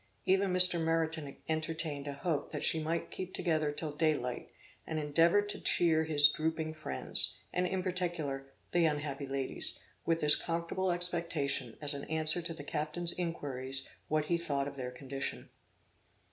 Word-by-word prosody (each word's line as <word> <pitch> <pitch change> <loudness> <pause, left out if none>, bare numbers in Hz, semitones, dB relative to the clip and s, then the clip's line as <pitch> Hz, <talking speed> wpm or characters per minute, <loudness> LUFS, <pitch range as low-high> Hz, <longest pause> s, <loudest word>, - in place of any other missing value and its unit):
Even 195 0 +2
Mr. 180 -2 +8
Meriton 160 -3 -1
entertained 155 -2 -3
a 140 - -3
hope 150 +1 -2
that 150 - -4
she 160 - +3
might 165 +2 -2
keep 185 0 -6
together 155 -4 0
till 150 +1 -5
day 155 +1 +2
light; 125 -2 -5 0.4
and 160 - -3
endeavored 165 +7 +3
to - - -5
cheer 160 -2 +3
his 145 -2 +6
drooping 155 +1 -2
friends, 65 - +2 0.2
and 180 0 +1
in 185 0 -2
particular 170 -7 -2 0.2
the 175 - +3
unhappy 145 -2 -2
ladies, 135 0 -2 0.3
with 165 0 +1
this 150 0 +7
comfortable 170 +2 -2
expectation, 170 -8 -1
as 145 0 +2
an 140 - -5
answer 160 +2 0
to 170 0 -5
the 145 - -8
captain's 155 +4 +1
inquiries 135 -6 -2 0.2
what 155 0 0
he 170 +2 0
thought 140 -4 -1
of 140 - -7
their 125 -2 -4
condition. 135 +2 -5
155 Hz, 160 wpm, -32 LUFS, 145-170 Hz, 0.4 s, Mr